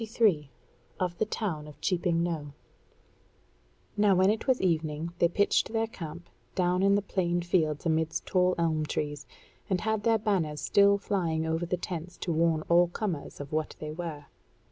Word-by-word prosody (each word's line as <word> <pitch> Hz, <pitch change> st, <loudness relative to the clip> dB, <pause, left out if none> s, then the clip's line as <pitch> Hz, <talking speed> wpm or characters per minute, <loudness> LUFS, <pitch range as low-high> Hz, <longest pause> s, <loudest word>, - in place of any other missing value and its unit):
CHAPTER 225 Hz, +2 st, -10 dB
23 165 Hz, -11 st, +3 dB, 0.5 s
Of 180 Hz, -2 st, -1 dB
the 220 Hz, -, +2 dB
Town 170 Hz, -10 st, -3 dB
of 150 Hz, -, -13 dB
Cheaping 170 Hz, -2 st, +1 dB
Knowe 155 Hz, -4 st, -3 dB, 1.4 s
Now 205 Hz, -2 st, +4 dB
when 190 Hz, +2 st, +5 dB
it 220 Hz, -, -3 dB
was 260 Hz, -1 st, +3 dB
evening 160 Hz, -2 st, -1 dB
they 170 Hz, -, +5 dB
pitched 200 Hz, +5 st, +2 dB
their 225 Hz, 0 st, +1 dB
camp 170 Hz, -6 st, -8 dB, 0.3 s
down 180 Hz, 0 st, +2 dB
in 200 Hz, +1 st, +4 dB
the 205 Hz, -, +1 dB
plain 175 Hz, -3 st, 0 dB
fields 160 Hz, -4 st, 0 dB
amidst 160 Hz, -1 st, 0 dB
tall 180 Hz, -1 st, +2 dB
elmtrees, 155 Hz, -3 st, -1 dB, 0.4 s
and 185 Hz, -2 st, +1 dB
had 220 Hz, -1 st, 0 dB
their 225 Hz, +1 st, +3 dB
banners 185 Hz, -9 st, 0 dB
still 200 Hz, +4 st, +4 dB
flying 170 Hz, -6 st, -1 dB
over 160 Hz, +2 st, -1 dB
the 180 Hz, -, -1 dB
tents 175 Hz, 0 st, -6 dB
to 175 Hz, -, -3 dB
warn 160 Hz, -1 st, +2 dB
all 175 Hz, +2 st, +4 dB
comers 175 Hz, -4 st, -4 dB
of 145 Hz, 0 st, -7 dB
what 155 Hz, 0 st, -2 dB
they 150 Hz, 0 st, -6 dB
were. 155 Hz, -3 st, -6 dB
175 Hz, 170 wpm, -29 LUFS, 160-195 Hz, 1.4 s, when